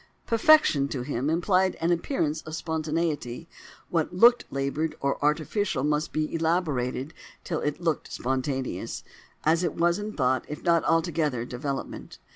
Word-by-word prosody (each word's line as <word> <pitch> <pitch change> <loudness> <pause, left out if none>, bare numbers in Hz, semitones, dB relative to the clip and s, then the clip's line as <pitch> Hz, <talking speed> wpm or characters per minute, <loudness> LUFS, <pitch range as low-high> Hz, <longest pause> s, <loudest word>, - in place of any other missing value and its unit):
Perfection, 230 - +5
to 135 -3 -4
him, 135 +1 -2
implied 185 +3 +2
an 165 +1 0
appearance 165 - 0
of 155 - -7
spontaneity: 160 -3 -2 0.4
what 165 -1 0
looked 235 +7 +5
laboured 140 +3 -2
or 140 +1 -1
artificial 155 +1 0
must 150 +2 0
be 155 0 -2
elaborated 160 -5 -1 0.3
till 165 -4 -2
it 150 0 -2
looked 165 -5 -1
spontaneous—as 135 +5 -2
it 170 - -1
was 170 +2 +2
in 210 +1 -5
thought 130 -2 +1
if 150 - -7
not 170 -2 +3
altogether 160 -6 +1
in 120 - -10
development. 135 +3 -5
155 Hz, 140 wpm, -27 LUFS, 140-170 Hz, 0.4 s, Perfection